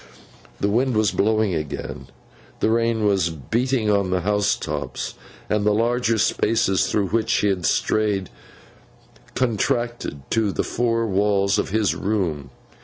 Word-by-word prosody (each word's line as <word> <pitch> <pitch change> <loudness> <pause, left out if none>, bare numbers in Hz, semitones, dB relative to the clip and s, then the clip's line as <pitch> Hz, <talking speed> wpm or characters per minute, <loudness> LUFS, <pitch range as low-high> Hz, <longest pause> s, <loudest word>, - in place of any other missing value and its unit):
The - - +1
wind 120 +3 +1
was 110 -1 +3
blowing 110 -2 +1
again, 75 -4 -5 0.5
the 110 - +2
rain 115 -1 +1
was 95 -5 +2
beating 110 - -1
on 100 -2 +1
the 90 -1 0
house 105 +1 +1
tops, - - -4 0.3
and 105 -1 0
the 105 0 +3
larger 115 0 +1
spaces 100 0 +2
through 100 -3 0
which 115 0 0
he 105 - +2
had 90 -3 0
strayed 105 -3 0 1.0
contracted 120 - -1
to 110 -3 +1
the - - -1
four 115 -1 0
walls 100 -1 +2
of - - -1
his 105 -1 +1
room. 90 -9 -2
105 Hz, 140 wpm, -22 LUFS, 95-115 Hz, 1.0 s, was